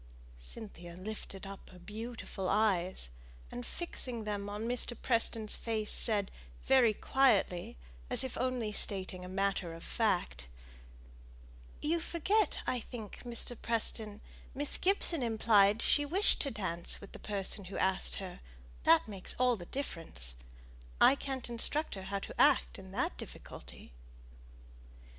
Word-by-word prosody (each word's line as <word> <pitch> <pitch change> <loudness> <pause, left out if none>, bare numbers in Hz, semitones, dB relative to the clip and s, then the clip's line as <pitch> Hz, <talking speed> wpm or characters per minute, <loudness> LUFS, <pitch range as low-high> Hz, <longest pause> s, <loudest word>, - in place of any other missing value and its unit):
Cynthia 175 - -8
lifted 195 0 -6
up 195 0 -10
her 185 - -14
beautiful 215 -1 -6
eyes, 190 - +1 0.4
and, 120 - -6
fixing 250 - -5
them 205 -1 -3
on 210 +2 -4
Mr. 240 0 -1
Preston's 230 -3 +2
face, 220 -2 -1
said, 205 -3 +3 0.3
very 255 -4 +5
quietly, 205 - +2 0.3
as - - +9
if 260 - -2
only 250 -4 -1
stating 190 -3 +1
a 180 - -8
matter 190 -3 -1
of 165 - -11
fact, 175 - -1 1.4
"You 330 +3 +1
forget, 365 +6 +1
I 250 - 0
think, 225 -3 -8
Mr. 240 0 -3
Preston: 220 -2 -1 0.3
Miss 290 +1 -1
Gibson 360 -5 +2
implied 215 -3 +4
that - - -4
she 290 - +3
wished 365 +8 +3
to 280 - 0
dance 175 -8 +2
with 200 - -12
the - - -9
person 200 -1 0
who 190 - -7
asked 190 0 +1
her 190 -2 -7 0.5
that 165 - +6
makes 195 -3 -6
all 250 -1 +3
the 175 -5 -10
difference. 165 - -4 0.7
I - - +8
can't 270 -2 -4
instruct 240 +6 -2
her 190 -1 -7
how 200 +1 -2
to - - -3
act - - +4
in - - -11
that - - -1
difficulty." - - -10
215 Hz, 140 wpm, -33 LUFS, 190-245 Hz, 1.4 s, as